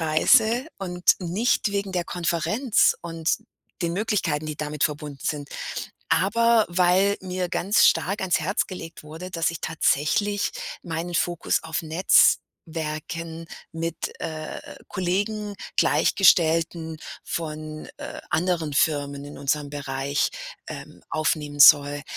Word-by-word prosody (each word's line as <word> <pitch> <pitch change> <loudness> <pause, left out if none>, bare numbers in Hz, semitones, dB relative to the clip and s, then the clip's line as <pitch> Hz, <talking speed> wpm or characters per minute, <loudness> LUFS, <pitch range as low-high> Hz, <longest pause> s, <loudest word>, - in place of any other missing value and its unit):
Reise 220 - +4
und 180 -2 -6 0.2
nicht 200 +5 0
wegen 200 -1 -2
der 175 -2 -1
Konferenz 180 - +1
und 165 -1 -1 0.5
den 170 -1 0
Möglichkeiten, 175 -7 -1
die 155 -1 -5
damit 150 -1 -1
verbunden 150 -1 -3
sind, 145 -2 -2 0.6
aber 230 +3 +3
weil 185 +3 +3
mir 185 -1 -3
ganz 195 +4 +3
stark 195 +3 +2
ans 185 -2 +1
Herz 175 +5 0
gelegt 170 -3 -9
wurde, 160 +4 -9
dass 165 -2 0
ich 170 - -7
tatsächlich 165 +6 +1 0.3
meinen 170 0 -4
Fokus 175 -1 0
auf 160 +1 -3
Netzwerken 165 -1 +1 0.3
mit, 165 0 -4
äh, 155 -1 -5
äh, - - -12
Kollegen, 205 +3 -2 0.2
Gleichgestellten 165 -3 +3 0.3
von, 155 -1 -5
äh, - - -7
anderen 170 -2 0
Firmen 145 -1 0
in 145 - -10
unserem 145 +1 -1
Bereich, 140 0 -2 0.4
ähm, - - -9
aufnehmen 150 -2 -1
soll. 145 0 +7
165 Hz, 120 wpm, -24 LUFS, 155-185 Hz, 0.6 s, soll